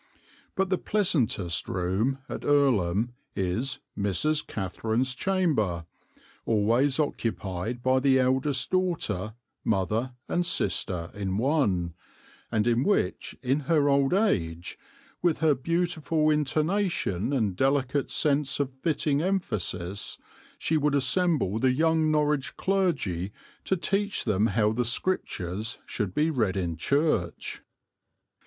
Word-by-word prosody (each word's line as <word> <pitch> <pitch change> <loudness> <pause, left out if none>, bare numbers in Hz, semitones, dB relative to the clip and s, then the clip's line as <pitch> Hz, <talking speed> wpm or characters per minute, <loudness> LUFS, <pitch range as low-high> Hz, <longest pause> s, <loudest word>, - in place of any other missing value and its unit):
But 190 0 0
the 185 - +2
pleasantest 120 - 0
room 95 +9 0
at - - -6
Earlham 120 -7 +2 0.2
is 115 +10 -1 0.2
'Mrs. 140 +10 +1
Catherine's 110 +6 -1
Chamber,' 130 - 0 0.6
always 115 +7 +2
occupied 115 - -2
by 130 0 +3
the 135 0 +4
eldest 130 +1 +1
daughter, 165 - -1 0.3
mother 110 +5 0
and 175 - +1
sister 90 - 0
in 95 -2 -2
one, 105 - +1 0.6
and 110 -1 +1
in 120 +1 +2
which 205 - 0
in 135 +3 +1
her 150 -3 +4
old 140 -1 +3
age, 90 - 0 0.5
with 170 -3 +2
her 155 -1 +3
beautiful 160 +1 0
intonation 150 - 0
and 110 -9 0
delicate 135 +3 +1
sense 145 -2 +1
of 135 -2 -1
fitting 150 -3 +1
emphasis, 105 - -2 0.4
she 160 - 0
would 145 -1 +1
assemble 140 - +2
the 130 +1 +3
young 160 +2 +2
Norwich 150 -2 0
clergy 140 - 0 0.3
to 190 - +1
teach 200 +4 -1
them 105 -1 +2
how 105 0 +2
the 120 +3 0
Scriptures 110 - -2
should 100 -4 -3
be 155 +2 +2
read 110 - 0
in 85 -3 -1
church." 110 - 0
130 Hz, 120 wpm, -27 LUFS, 100-155 Hz, 0.6 s, the